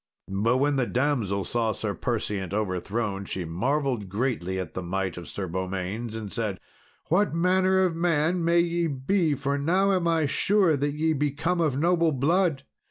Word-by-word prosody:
But 110 +6 +2
when 140 +1 +2
the 125 -3 +1
damsel 120 -8 0
saw 115 +3 0
Sir 105 -1 -3
Perseant 100 -6 -2
overthrown, 100 +1 -2
she 95 -2 -4
marvelled 125 - -1
greatly 100 -4 -1
at 90 -4 -5
the 95 - -4
might 95 0 -2
of 90 - -8
Sir 100 - -4
Beaumains, 95 +5 -4
and 105 -3 -6
said, 110 -5 -2 0.5
"What 185 +1 +2
manner 185 +2 +3
of 175 -3 -1
man 170 +1 +1
may 170 +1 +4
ye 170 0 0
be, 155 +3 +1
for 140 +1 -1
now 185 +7 +2
am 180 -3 +1
I 165 -2 +2
sure 180 +4 +2
that 145 +1 -1
ye 160 +1 +1
be 145 0 +1
come 165 +5 -1
of 150 -5 +1
noble 170 +1 +3
blood? 155 +1 +1
135 Hz, 175 wpm, -26 LUFS, 100-165 Hz, 0.5 s, may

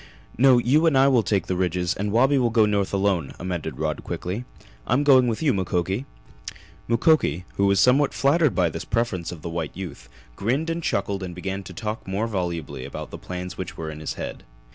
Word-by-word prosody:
"No, 130 +1 +6
you 140 +7 +3
and 150 -4 +3
I 135 +1 +6
will 130 -4 +4
take 100 -2 0
the 95 - -2
ridges 90 0 0
and 105 +1 -3
Wabi 135 +5 +4
will 120 -2 +2
go 110 -1 +4
north 100 -2 0
alone," 95 -7 0
amended 90 -2 -4
Rod - - -2
quickly. 100 +8 -4 0.4
"I'm 130 +5 +2
going 130 -3 +6
with 115 +5 -2
you, 145 - +3
Mukoki!" 95 +4 -1 0.8
Mukoki, 115 - +2
who 100 - +3
was 100 -1 +3
somewhat 135 +3 +4
flattered 150 +1 +2
by 90 -3 +3
this 80 - -5
preference 95 -8 -1
of 80 -3 -9
the - - -4
white 80 -1 -4
youth, 75 -11 -8 0.3
grinned 135 - 0
and 165 +1 -3
chuckled 100 -8 -1
and 90 -2 -6
began 95 +2 -4
to - - -9
talk 110 -2 -5
more 100 +4 -1
volubly 85 - -3
about - - -7
the - - -7
plans 90 0 -6
which 95 - -6
were 80 -1 -4
in 75 - -9
his 75 - -4
head. - - -6
100 Hz, 210 wpm, -24 LUFS, 90-125 Hz, 0.8 s, No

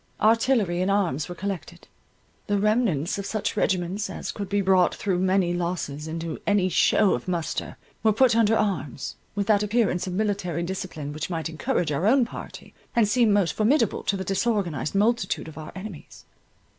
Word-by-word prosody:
Artillery 220 -5 +3
and 185 - +1
arms 180 -8 0
were 175 - -6
collected; 175 -3 -6 0.6
the 205 - +1
remnants 205 - +1
of 200 - -4
such 215 0 -2
regiments, 185 +2 0
as - - -5
could 200 -2 -6
be 205 +1 +1
brought 190 -2 +3
through 190 -3 -1
many 185 -1 +2
losses 170 -4 -3
into 165 0 -4
any 200 -3 +3
show 200 +2 +4
of 120 - -4
muster, 170 -3 -3 0.2
were 220 - +4
put 235 +2 +4
under 225 -1 +4
arms, 155 - -2 0.2
with 200 -1 0
that 205 -1 +3
appearance 210 -4 +1
of 180 - -3
military 195 -4 -1
discipline 170 -5 -5
which 155 +3 -4
might 165 -2 -3
encourage 165 - -1
our 160 +7 0
own 255 +2 +5
party, 235 - -9 0.2
and 230 -3 +4
seem 230 0 +3
most 200 -5 +3
formidable 230 0 +2
to 200 - -1
the 190 - -3
disorganized 195 - -1
multitude 210 -3 +1
of 160 - -10
our 155 - -8
enemies. 190 -4 -9
190 Hz, 175 wpm, -25 LUFS, 170-215 Hz, 0.6 s, own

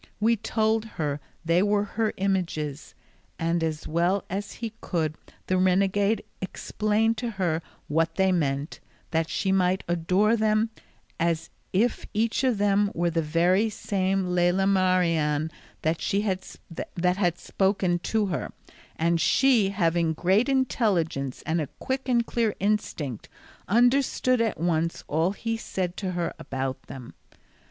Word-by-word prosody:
We 225 +2 +3
told 220 0 0
her 150 -3 -1 0.3
they 170 +2 +3
were 205 0 +2
her 215 +1 -1
images; 170 -7 -2 0.4
and 165 0 0
as 155 -1 -2
well 175 +4 +1
as 200 +2 -3
he 225 -1 -5
could 160 -4 -1 0.3
the 185 0 +1
renegade 195 +3 +2 0.2
explained 215 +3 0
to 240 +1 -2
her 180 -6 -1 0.3
what 165 +2 +1
they 190 0 +3
meant, 145 -3 -1 0.3
that 160 0 0
she 190 - 0
might 185 0 +2
adore 180 +6 +2
them 215 0 +2 0.5
as 165 -1 0 0.2
if 225 +6 +1
each 230 +4 +1
of 255 -4 +2
them 205 0 +3
were 170 0 +1
the 165 0 +1
very 175 +7 +2
same 195 -3 -1
Lela 180 +1 +2
Marien 165 -5 +2 0.3
that 160 +1 +1
had 185 -2 -1
spoken 190 -3 0
to 215 +4 0
her; 180 -5 -3 0.4
and 165 0 +1
she, 250 -7 +4
having 170 -4 +1
great 190 - +2
intelligence 190 - 0
and 160 +1 0
a 150 - -3
quick 265 0 -3
and 235 -2 +3
clear 230 -3 0
instinct, 180 - -2 0.4
understood 245 +2 +3
at 225 -7 0
once 165 0 0
all 165 +5 +1
he 225 +2 -2
said 185 -5 -3
to 185 -3 -3
her 175 -1 -2
about 130 -1 -3
them. 130 -2 -9
185 Hz, 135 wpm, -26 LUFS, 165-210 Hz, 0.5 s, she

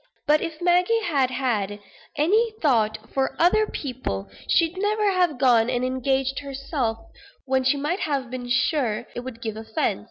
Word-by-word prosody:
But 300 +1 +4
if 320 -2 -5
Maggie 360 +6 +3
had 280 -8 +1
had 210 -6 -1 0.4
any 430 +9 +2
thought 220 -7 +2 0.2
for 265 0 -1
other 425 +6 +4
people, 230 - -5 0.2
she'd 335 +1 +3
never 415 0 +1
have 355 -6 +1
gone 245 -3 +4
and 250 0 0
engaged 265 +1 0
herself, 275 -4 -3 0.5
when 265 -1 +1
she 260 +3 +2
might 300 +7 -1
have 275 -5 -2
been 250 -1 -5
sure 245 -3 +1
it - - -4
would 245 -2 -8
give 220 -2 -3
offence. 220 - -2
265 Hz, 160 wpm, -24 LUFS, 245-325 Hz, 0.5 s, But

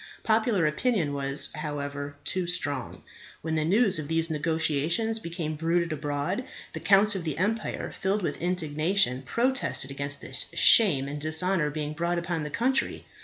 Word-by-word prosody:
Popular 220 -5 +2
opinion 155 - 0
was, 140 0 0
however, 145 -2 -5
too 185 -2 -1
strong. 145 -7 -3 0.4
When 160 0 -3
the 155 -1 0
news 195 +2 +3
of 150 - -5
these 165 +1 0
negotiations 160 +7 0
became 170 -4 -4
bruited 165 +1 0
abroad, 150 - -3 0.3
the - - -5
counts 200 +1 +4
of 190 -3 -4
the 155 -3 -4
empire, 210 +5 -2
filled 195 +1 -2
with - - -3
indignation, 165 -4 +1
protested 235 - -1
against 140 +1 -2
this - - -2
shame 155 - +7
and 145 +1 -6
dishonour 160 +1 +1
being 150 0 -4
brought 170 +3 -1
upon 170 -1 -2
the 150 - -4
country. 260 - -1
165 Hz, 155 wpm, -27 LUFS, 145-190 Hz, 0.4 s, shame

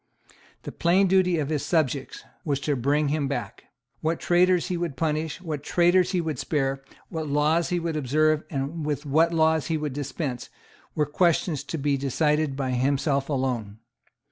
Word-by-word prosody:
The - - -6
plain 180 +4 +3
duty 185 -2 +3
of 150 -2 -2
his 150 -3 -1
subjects 145 -5 -1 0.2
was 140 -3 -1
to 145 -1 0
bring 140 +4 +1
him 145 -1 0
back. 140 - -5 0.3
What 160 +1 -1
traitors 180 +1 +3
he 180 - -1
would 170 -5 -3
punish 155 -1 -1
and 185 - -15
what 150 -3 -3
traitors 175 +4 +3
he 185 - 0
would 160 -6 -3
spare, 135 -3 -1 0.3
what 160 -3 -4
laws 150 +4 +2
he 180 - 0
would 165 -1 -3
observe 155 +2 +2
and 145 +3 -3
with 150 -1 -2
what 160 +4 +3
laws 160 -3 +2
he 165 -1 0
would 150 -3 -3
dispense, 140 -2 -4 0.5
were 150 - +2
questions 165 0 +1
to 165 - -4
be 140 -1 0
decided 150 +2 0
by 135 -2 -2
himself 140 +2 0
alone. 125 -7 -2
150 Hz, 175 wpm, -25 LUFS, 140-165 Hz, 0.5 s, plain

